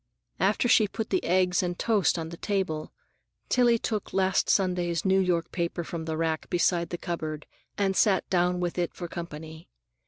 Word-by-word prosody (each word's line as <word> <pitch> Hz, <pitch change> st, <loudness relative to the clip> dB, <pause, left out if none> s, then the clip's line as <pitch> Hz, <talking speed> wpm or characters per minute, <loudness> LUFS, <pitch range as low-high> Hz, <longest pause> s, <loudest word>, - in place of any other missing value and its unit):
After -, -, +2 dB
she 220 Hz, -2 st, +5 dB
put 220 Hz, +2 st, -5 dB
the 185 Hz, -, +1 dB
eggs 180 Hz, 0 st, +2 dB
and 175 Hz, -1 st, -2 dB
toast 210 Hz, -6 st, +2 dB
on 160 Hz, -1 st, -4 dB
the 170 Hz, -, -8 dB
table, 185 Hz, -7 st, -2 dB, 0.6 s
Tillie 240 Hz, -2 st, +4 dB
took 215 Hz, -2 st, -3 dB
last 190 Hz, 0 st, +2 dB
Sunday's 180 Hz, -3 st, +1 dB
New 190 Hz, 0 st, +4 dB
York 175 Hz, -3 st, 0 dB
paper 170 Hz, 0 st, -2 dB
from 165 Hz, 0 st, -5 dB
the 160 Hz, -1 st, -3 dB
rack 160 Hz, -1 st, -1 dB
beside 175 Hz, -1 st, +1 dB
the 175 Hz, -, -4 dB
cupboard 155 Hz, -3 st, -4 dB, 0.3 s
and 195 Hz, -1 st, +1 dB
sat 195 Hz, -3 st, +3 dB
down, 180 Hz, -1 st, +1 dB
with 175 Hz, 0 st, -2 dB
it 175 Hz, -, -2 dB
for 175 Hz, -, -5 dB
company. 160 Hz, -1 st, -8 dB
175 Hz, 180 wpm, -27 LUFS, 170-190 Hz, 0.6 s, she